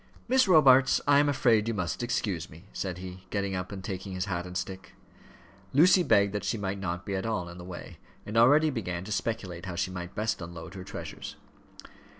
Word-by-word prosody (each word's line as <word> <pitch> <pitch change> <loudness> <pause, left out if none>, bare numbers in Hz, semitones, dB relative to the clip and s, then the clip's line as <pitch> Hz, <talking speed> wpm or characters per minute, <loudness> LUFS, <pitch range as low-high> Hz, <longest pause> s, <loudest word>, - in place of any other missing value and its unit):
"Miss 260 -1 +4
Robarts, 135 -7 +6
I 145 0 +6
am 145 0 +3
afraid 115 -6 +3
you 115 - -1
must 90 -1 -2
excuse 100 -8 -2
me," 80 +5 -14
said 95 -2 -3
he, 90 0 -9
getting 100 -1 -2
up 90 +1 -4
and 95 -2 -7
taking 95 0 -5
his 90 0 -2
hat 90 -2 -3
and 90 0 -4
stick. 95 -1 -6 0.8
Lucy 180 +6 +6
begged 100 - +3
that 105 -2 -2
she 105 +3 -1
might 100 -1 -3
not 90 0 -4
be 100 - -3
at 95 - -2
all 105 -6 -2
in 85 +1 -10
the - - -8
way, 90 -1 -9 0.3
and 105 - -6
already 145 +7 +6
began 90 -8 -3
to 105 - -8
speculate 100 -5 -3
how 90 - -4
she 95 +1 -1
might 90 0 -7
best 110 -2 -1
unload 85 0 -8
her 95 -2 -7
treasures. - - -7
100 Hz, 210 wpm, -28 LUFS, 90-115 Hz, 0.8 s, Robarts